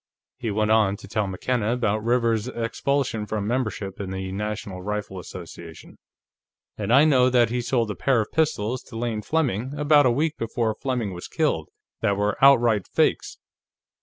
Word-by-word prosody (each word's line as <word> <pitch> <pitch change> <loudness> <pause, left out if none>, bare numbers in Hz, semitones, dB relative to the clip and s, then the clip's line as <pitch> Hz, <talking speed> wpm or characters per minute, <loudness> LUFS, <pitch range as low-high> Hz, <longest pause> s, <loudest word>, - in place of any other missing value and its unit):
He 115 - -3
went 105 +1 0
on 105 -3 +3
to - - -12
tell 105 0 -1
McKenna 110 +4 -1
about 110 -3 0
Rivers's 115 -1 +1
expulsion 115 -1 -1
from 105 -2 -2
membership 105 -5 -2
in 100 -2 -4
the 95 0 -4
National 100 -2 -4
Rifle 105 -1 -4
Association. 85 -2 -11 0.8
"And 105 +1 -3
I 140 +5 +7
know 130 -4 +4
that 120 -2 +3
he 125 0 0
sold 115 -3 0
a - - -5
pair 130 +5 +2
of 110 - -2
pistols 130 -7 0
to 115 - -9
Lane 115 -2 -2
Fleming, 130 -2 -1
about 145 -1 +5
a - - +4
week 150 +5 0
before 115 -1 -1
Fleming 120 -5 -3
was 90 - -8
killed, - - -1 0.3
that 100 -1 +1
were 105 0 0
outright 120 -7 +5
fakes. - - 0
110 Hz, 170 wpm, -24 LUFS, 105-125 Hz, 0.8 s, I